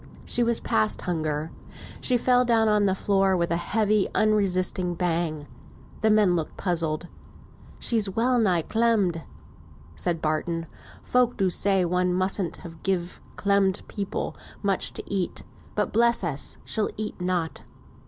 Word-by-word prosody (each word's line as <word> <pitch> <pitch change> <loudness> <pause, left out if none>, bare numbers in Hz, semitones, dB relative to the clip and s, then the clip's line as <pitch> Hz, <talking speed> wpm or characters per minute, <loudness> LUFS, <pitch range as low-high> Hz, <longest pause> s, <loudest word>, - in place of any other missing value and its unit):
She 245 - +1
was 235 -1 +3
past 110 -2 0
hunger. 155 -2 -2 0.5
She 250 - +2
fell 250 +1 +3
down 230 -2 +3
on 210 -1 +3
the 190 - +1
floor 195 -1 +2
with 170 -1 0
a - - +2
heavy 210 +3 +1
unresisting 185 -4 +1
bang. 165 -4 -1 0.6
The 220 - +3
men 210 -4 +4
looked 160 -2 -3
puzzled. 165 -2 -1 0.7
"She's 220 -4 +2
well 240 +5 +2
nigh 180 -7 +2
clemmed," 215 -7 +1 0.7
said 160 - -1
Barton. 165 +2 -1 0.4
"Folk 250 -1 +2
do 190 -3 +1
say 195 0 +2
one 180 +1 +1
mustn't 185 -1 -1 0.2
give 180 -2 -2
clemmed 200 -1 +1
people 200 -2 -4 0.3
much 195 -2 +1
to - - -5
eat; 190 -3 -2 0.3
but, 210 - -1
bless 235 0 +3
us, 150 -5 -3
she'll 215 - 0
eat 215 -3 -4
nought." 180 -3 -1
190 Hz, 140 wpm, -25 LUFS, 170-215 Hz, 0.7 s, men